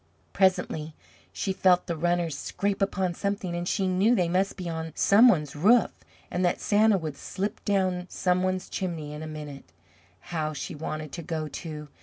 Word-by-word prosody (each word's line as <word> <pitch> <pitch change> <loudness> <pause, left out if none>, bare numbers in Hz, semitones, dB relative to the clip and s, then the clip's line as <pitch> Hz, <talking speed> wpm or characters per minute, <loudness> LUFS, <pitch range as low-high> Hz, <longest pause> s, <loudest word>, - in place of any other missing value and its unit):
Presently 160 -5 +1 0.4
she 190 - -2
felt 185 -1 +3
the 170 - -2
runners 175 -1 0
scrape 200 +7 -2
upon 190 -2 0
something, 200 -1 -2
and 175 0 -3
she 195 0 0
knew 195 +6 +3
they 180 -6 +2
must 190 +3 0
be 180 -2 -5
on 160 -1 -4
some 215 +5 +6
one's 150 - +2
roof, 215 +11 +4 0.4
and 180 - -1
that 175 - +1
Santa 210 0 +4
would 155 -5 -4
slip 200 +8 -4
down 185 -3 +1
some 180 0 +1
one's 185 0 -1
chimney 165 -5 -4
in 150 - -7
a 155 - -5
minute. 150 - -8 0.6
How 155 -2 -1
she 160 +4 -5
wanted 155 -1 -5
to 170 - -6
go, 160 -1 -3
too! 150 -1 -7
175 Hz, 180 wpm, -27 LUFS, 155-190 Hz, 0.6 s, some